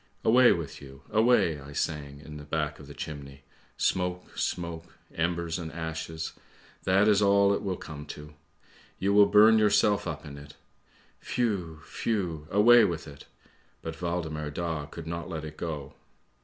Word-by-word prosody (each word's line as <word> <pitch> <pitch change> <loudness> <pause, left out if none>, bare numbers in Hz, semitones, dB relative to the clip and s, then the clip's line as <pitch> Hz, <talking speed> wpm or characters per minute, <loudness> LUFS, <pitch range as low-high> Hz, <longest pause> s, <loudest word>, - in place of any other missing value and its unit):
" - - -27
Away 125 +2 +7
with 80 -5 -3
you, 70 0 -12
away! 110 -8 +3
I 70 +1 -10
sang 70 -1 -3
in 75 0 -9
the 75 - -9
back 75 0 -2
of 75 - -12
the 70 - -11
chimney. 70 -3 -8 0.3
Smoke, 90 -1 -1
smoke, 85 -1 -4 0.2
embers 85 0 -1
and 80 -2 -6
ashes, 80 -1 -5 0.5
that 95 +2 +4
is 105 -1 +4
all 100 0 +5
it - - -1
will 95 -3 -2
come 75 -1 -9
to! 75 +1 -9 0.6
You 100 +1 +1
will 100 0 +7
burn 105 +2 +7
yourself 105 -1 +3
up - - -5
in 70 -1 -9
it. 70 0 -13 0.7
Whew! 90 -10 -2
whew! 90 -9 -2
away 115 +4 +7
with 85 -2 -1
it! 70 -2 -12 0.6
But 80 +1 -6
Waldemar 80 -3 -2
Daa 80 -1 -3
could 85 0 -9
not 85 +1 -5
let 80 -3 -5
it 75 0 -8
go. 75 -5 -5
85 Hz, 165 wpm, -28 LUFS, 75-100 Hz, 0.7 s, Away